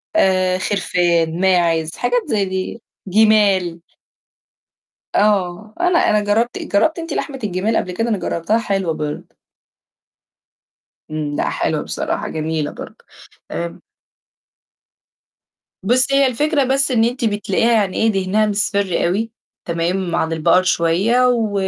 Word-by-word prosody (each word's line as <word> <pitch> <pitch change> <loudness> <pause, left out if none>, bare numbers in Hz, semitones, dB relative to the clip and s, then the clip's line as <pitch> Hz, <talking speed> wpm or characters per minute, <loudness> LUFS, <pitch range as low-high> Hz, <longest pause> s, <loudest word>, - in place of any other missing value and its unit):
آآ، 185 -7 +2
خِرفان، 175 -4 0
ماعِز 170 -4 +2
حاجات 245 0 0
زي 205 -2 +1
دي، 190 +4 -4 0.3
جِمال. 195 -4 +3 1.3
آه، 205 0 +1
أنا 355 -1 +3
أنا 210 - +3
جرّبت 225 +4 0
جرّبتِ 315 - 0
أنتِ 330 0 -5
لحمة 275 -3 -4
الجِمال 205 +3 -1
قبل 180 - -2
كده؟ 225 +6 -2
أنا 215 - +1
جرّبتها 185 +4 -1
حلوة 195 -7 -1
برضه. 150 -1 -6 1.8
إمم، 150 -1 -3
لأ، - - -1
حلوة - - -1
بصراحة - - -3
جميلة 155 -1 -3
برضه. - - -11 0.5
آمم 85 +1 -5 2.0
بُصّي 255 +6 +3
هي 275 -1 +4
الفكرة 290 +4 +1
بس 270 +1 +1
إن 230 -3 +3
أنتِ 240 +1 -1
بتلاقيها 210 +1 0
يعني 205 -5 +1
إيه 225 0 +2
دِهنها 195 +2 +1
مصفِر 200 -2 0
أوي 210 +6 -1 0.3
تمام، 170 +1 -1
عن 160 -1 0
البقر 165 +3 +3
شوية، 185 +8 +2
و 230 -4 0
200 Hz, 125 wpm, -19 LUFS, 175-230 Hz, 2.0 s, هي